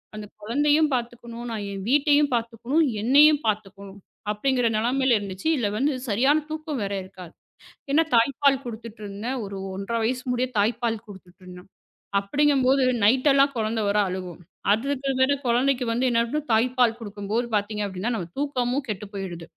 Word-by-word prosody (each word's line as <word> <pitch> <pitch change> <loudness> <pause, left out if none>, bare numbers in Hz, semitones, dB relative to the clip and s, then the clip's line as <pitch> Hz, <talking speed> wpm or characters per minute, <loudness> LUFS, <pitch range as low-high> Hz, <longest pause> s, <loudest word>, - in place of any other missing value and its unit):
அந்த 210 -1 -6 0.2
குழந்தையும் 290 +7 +2
பாத்துக்கணும், 240 -1 -5
நான் 210 -2 -4
என் 195 -1 -6
வீட்டையும் 290 0 +3
பாத்துக்கணும், 235 +7 0 0.2
என்னையும் 290 +5 +6
பாத்துக்கணும் 200 -1 -4 0.3
அப்படிங்கிற 245 +2 +1
நிலைமையில 250 +1 +2
இருந்துச்சு. 200 +6 -5
இதுல 225 -6 0
வந்து 285 +4 +1 0.2
சரியான 270 +9 +3
தூக்கம் 310 -3 -4
வேற 200 0 -3
இருக்காது. 185 -3 -12 0.6
ஏன்னா 320 +3 +4
தாய்ப்பால் 275 +3 +3
குடுத்துட்டு 230 -1 -8
இருந்தேன். 215 +6 -4
ஒரு 195 0 -7 0.2
ஒன்றரை 200 +4 -3
வயசு 250 +2 -1
முடிய 250 +1 0
தாய்ப்பால் 230 +1 0
குடுத்துட்டு 190 -1 -14
இருந்தேன். 180 +1 -12 0.5
அப்டிங்கும்போது 270 +4 +2 0.2
நைட் 255 +6 +4
எல்லாம் 275 0 +3
குழந்த 220 0 -1
வர 205 - +1
அழுவும். 180 -2 -6 0.3
அதுக்கு 275 +4 -1
வேற 260 +2 +4
குழந்தைக்கு 250 +2 +2
வந்து 245 +3 0
என்ன 230 -1 +2
பண்ண 300 +5 -1
தாய்ப்பால் 240 0 +2
கொடுக்கும்போது 210 +2 -3
பாத்தீங்கன்னா 205 +1 -2
நம்ம 175 -4 -5
தூக்கமும் 265 -1 -1
கெட்டு 210 0 -4
போயிடுது. 175 -4 -6
235 Hz, 145 wpm, -24 LUFS, 205-270 Hz, 0.6 s, என்னையும்